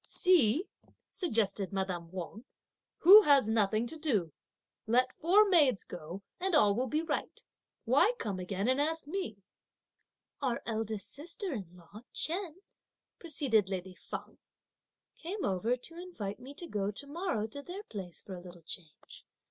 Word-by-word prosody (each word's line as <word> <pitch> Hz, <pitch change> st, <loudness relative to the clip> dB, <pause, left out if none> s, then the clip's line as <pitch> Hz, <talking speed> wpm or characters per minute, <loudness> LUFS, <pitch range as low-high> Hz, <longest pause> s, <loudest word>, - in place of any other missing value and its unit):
"See," 335 Hz, -, +3 dB, 0.4 s
suggested 215 Hz, -, 0 dB
madame 185 Hz, -4 st, -2 dB
Wang, 190 Hz, +5 st, -6 dB, 0.6 s
"who 395 Hz, +6 st, +11 dB
has 280 Hz, -, +5 dB
nothing 220 Hz, 0 st, +2 dB
to 315 Hz, +6 st, -5 dB
do; 210 Hz, -, 0 dB, 0.5 s
let 255 Hz, +3 st, +3 dB
four 395 Hz, +6 st, +5 dB
maids 295 Hz, -, +4 dB
go 175 Hz, +3 st, -8 dB, 0.2 s
and 370 Hz, -1 st, +1 dB
all 210 Hz, -9 st, +6 dB
will 250 Hz, +5 st, 0 dB
be 305 Hz, +6 st, 0 dB
right! 330 Hz, -, -3 dB, 0.4 s
why 485 Hz, -, +4 dB
come 200 Hz, -, -3 dB
again 195 Hz, +3 st, -2 dB
and 260 Hz, +2 st, +3 dB
ask 320 Hz, +1 st, 0 dB
me?" 290 Hz, -, -4 dB, 1.0 s
"Our 255 Hz, -4 st, -1 dB
eldest 220 Hz, -2 st, -3 dB
sister 335 Hz, +4 st, -5 dB
in 185 Hz, -7 st, -6 dB
law 180 Hz, +5 st, -13 dB
Chen," 355 Hz, +1 st, -2 dB, 0.6 s
proceeded 260 Hz, -, +1 dB
lady 185 Hz, -1 st, -4 dB
Feng, -, -, -8 dB, 0.8 s
"came 375 Hz, +5 st, -3 dB
over 210 Hz, +6 st, +1 dB
to 330 Hz, +7 st, -9 dB
invite 215 Hz, -, -6 dB
me 270 Hz, +3 st, -10 dB
to 345 Hz, -, -6 dB
go 205 Hz, -10 st, -2 dB
to 210 Hz, +7 st, -5 dB
morrow 290 Hz, -, -2 dB
to 255 Hz, +6 st, -7 dB
their 365 Hz, +7 st, -7 dB
place 185 Hz, -, -7 dB
for 195 Hz, -, -8 dB
a 180 Hz, -, -7 dB
little 175 Hz, -1 st, -12 dB
change. 160 Hz, -1 st, -11 dB
235 Hz, 150 wpm, -32 LUFS, 195-325 Hz, 1.0 s, who